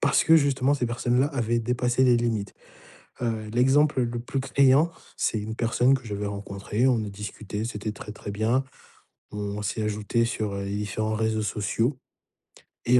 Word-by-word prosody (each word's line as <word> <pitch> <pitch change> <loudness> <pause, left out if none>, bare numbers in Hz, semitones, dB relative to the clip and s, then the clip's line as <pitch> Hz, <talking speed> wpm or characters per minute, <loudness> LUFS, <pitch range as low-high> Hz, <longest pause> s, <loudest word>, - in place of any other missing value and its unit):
parce 140 0 +3
que 165 - +7
justement 140 -2 +2
ces 125 -3 -1
personnes-là 120 +2 +1
avaient 120 -4 0
dépassé 125 +2 +1
les 125 -2 +5
limites. 115 -4 -1 0.7
Heu, 110 -2 -2
l'exemple 135 +3 +4
le 120 0 -3
plus 130 +3 -3
criant, 140 +4 +4 0.3
c'est 110 - 0
une 110 +2 -5
personne 120 +3 +3
que 130 - -5
j'avais 105 -1 -4
rencontrée, 100 +4 -2
on 125 - +3
a - - -5
discuté, 105 +1 -6
c'était 105 -2 -4
très, 105 - -8
très 100 - -7
bien. 115 +6 +1 0.7
On 105 0 -4
s'est 105 +2 -2
ajouté 105 +2 0
sur, 110 -4 -2
heu, 100 - -3
les 100 +1 -3
différents 110 +1 -2
réseaux 110 0 0
sociaux 110 +6 0 0.9
et 125 +1 +5
115 Hz, 170 wpm, -26 LUFS, 105-125 Hz, 0.9 s, que